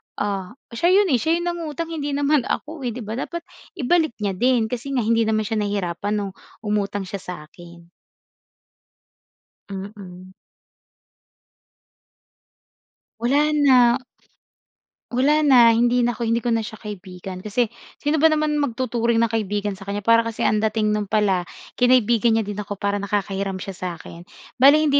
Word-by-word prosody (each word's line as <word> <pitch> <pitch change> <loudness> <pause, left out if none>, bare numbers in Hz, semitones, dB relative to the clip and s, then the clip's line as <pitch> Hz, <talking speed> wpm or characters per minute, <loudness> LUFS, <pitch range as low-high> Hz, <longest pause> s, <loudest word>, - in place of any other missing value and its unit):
ah, 200 +1 -3 0.2
siya 340 +11 +2
'yon, 395 -5 +4
eh, 250 - +3
siya 320 +4 +1
'yong 345 +1 -2
nangutang 330 -1 -5
hindi 290 -3 -3
naman 285 -2 +2
ako, 315 0 -4
eh, 230 - -3
'di 245 - -6
ba 220 +3 -5
dapat 340 +4 -5 0.3
ibalik 315 0 +1
niya 200 - +1
din 245 -3 +2
kasi 255 +3 -4
nga 245 - +1
hindi 230 0 +2
naman 215 0 +1
siya 220 0 -2
nahirapan 200 -1 -2
nung 200 -2 -3 0.3
umutang 205 -1 -1
siya 195 +1 -6
sa 180 - -7
akin. 170 +2 -15 1.9
Mm. 190 -2 -9 2.9
Wala 280 +6 +2
na. 255 -4 +5 1.1
Wala 275 +5 +3
na, 255 -6 +6
hindi 240 +2 +3
na 240 - +2
ako 235 0 -4
hindi 230 +1 0
ko 240 - 0
na 230 - +2
siya 220 0 -6
kaibigan. 185 -3 -8
Kasi 215 +4 -1 0.2
sino 295 +1 -1
ba 320 - +6
naman 305 -1 +1
magtuturing 235 -3 0
na 230 - 0
kaibigan 210 -2 -1
sa 195 0 -10
kanya, 200 0 -3
para 230 +1 +5
kasi 230 -1 -2
ang 215 - +2
dating 215 0 +1
no'n 210 -1 -1
pala 195 -4 +1 0.3
kinaibigan 240 -2 +4
niya 225 - +1
din 205 0 -6
ako 205 0 -5
para 200 +1 -1
nakakahiram 195 -1 -2
siya 185 +1 -6
sa'kin. 175 -1 -8 0.3
Bale 275 +3 +8
hindi 285 -2 +3
225 Hz, 160 wpm, -22 LUFS, 200-260 Hz, 2.9 s, Bale